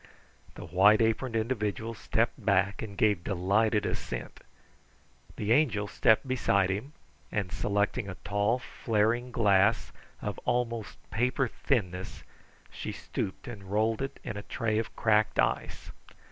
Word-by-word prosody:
The - - -8
white 95 +6 +5
aproned 115 +2 +1
individual 110 -1 -1
stepped - - -1
back 95 +1 +2
and 100 -3 -7
gave 105 -6 +2
delighted 100 +3 +1
assent. - - -4 1.0
The 105 +1 -2
Angel 115 -7 +3
stepped 110 +5 +3
beside 100 -7 +2
him, 110 +10 -4 0.4
and 100 -4 -2
selecting 100 +1 0
a 95 - -6
tall, 105 +4 +1
flaring 120 0 0
glass, 105 -1 +3 0.3
of - - -4
almost 115 -3 -1
paper 125 +3 +1
thinness, 95 -8 -2 0.5
she - - -5
stooped 95 - -5
and 105 -5 -8
rolled 110 +3 +1
it 135 - -4
in 105 -4 -5
a - - -4
tray 110 +1 -1
of 115 - -5
cracked 110 -2 +2
ice. - - -1
110 Hz, 130 wpm, -29 LUFS, 100-115 Hz, 1.0 s, white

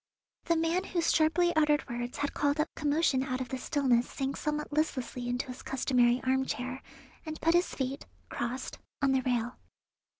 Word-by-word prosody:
The 335 - +2
man 330 +3 +1
whose 340 -3 +1
sharply 340 +2 +3
uttered 300 -1 +3
words 240 +1 -4
had 285 -1 -1
called 290 +1 +1
up 305 - 0
commotion 295 -2 +2
out 260 -1 -2
of 255 -2 -4
the 260 - -3
stillness 250 -4 +2
sank 270 0 -3
somewhat 300 0 -3
listlessly 255 -5 -1
into 245 +2 -1
his 255 -1 -8
customary 250 -2 +2
armchair, 260 0 -1 0.4
and 315 -1 -6
put 330 - +3
his 350 +1 +2
feet, 265 +1 -3 0.2
crossed, 245 +2 -4 0.2
on 275 - +4
the 265 -1 +3
rail. 245 -1 -1
270 Hz, 170 wpm, -30 LUFS, 255-310 Hz, 0.4 s, on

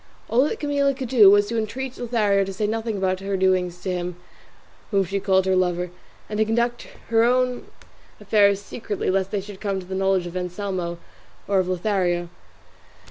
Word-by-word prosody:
All 245 +3 +4
that - - -4
Camilla 280 -2 +1
could 260 -3 -5
do 220 -6 +8
was 205 +1 +5
to 230 +2 -2
entreat 250 +4 -4
Leonela 215 -6 +1
to 195 - -5
say 210 +3 -1
nothing 225 0 -2
about 185 -1 0
her 195 0 -2
doings 185 -2 +1
to 190 - -1
him 180 -1 -3 0.7
whom 200 -2 +2
she 195 +3 -2
called 190 -1 +2
her 190 0 +2
lover, 180 -1 0 0.4
and 210 0 -4
to 220 - +4
conduct 235 +2 -1 0.2
her 225 0 +4
own 250 +1 +1 0.5
affairs 200 -1 +3
secretly 205 -1 -3
lest 190 0 0
they 205 -1 -2
should 200 -1 -11
come 200 -2 -1
to 185 - -9
the 190 - -7
knowledge 190 -1 +1
of 175 0 -7
Anselmo 180 -1 -3 0.5
or 200 -1 +2
of 185 - 0
Lothario. 180 -2 0
200 Hz, 190 wpm, -23 LUFS, 185-225 Hz, 0.7 s, do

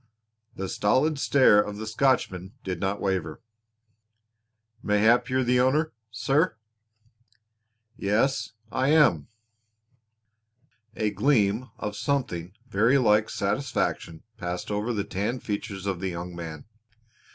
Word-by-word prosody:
The 95 - -4
stolid 135 +11 +1
stare 130 -8 +5
of 105 0 -5
the 110 - -5
Scotchman 110 -6 0
did 90 -3 -4
not 95 +3 -1
waver. 95 -6 -2 1.4
"Mayhap 110 +5 +3
you're 130 0 +1
the 125 0 +2
owner, 145 +5 +2 0.2
sir." 135 +10 +1 1.4
"Yes, 115 +7 0 0.2
I 130 +1 0
am." 145 - +4 1.7
A 110 -2 0
gleam 115 -3 +1
of 105 0 -4
something 100 -9 -2
very 115 +5 +3
like 110 -3 +3
satisfaction 100 - -2
passed 90 +3 -4
over 105 +3 -1
the 105 -4 -1
tanned 105 +5 -3
features 100 -2 -4
of 95 -3 -2
the 95 +1 -2
young 85 0 -6
man. 80 -3 -7
105 Hz, 115 wpm, -26 LUFS, 95-130 Hz, 1.7 s, stare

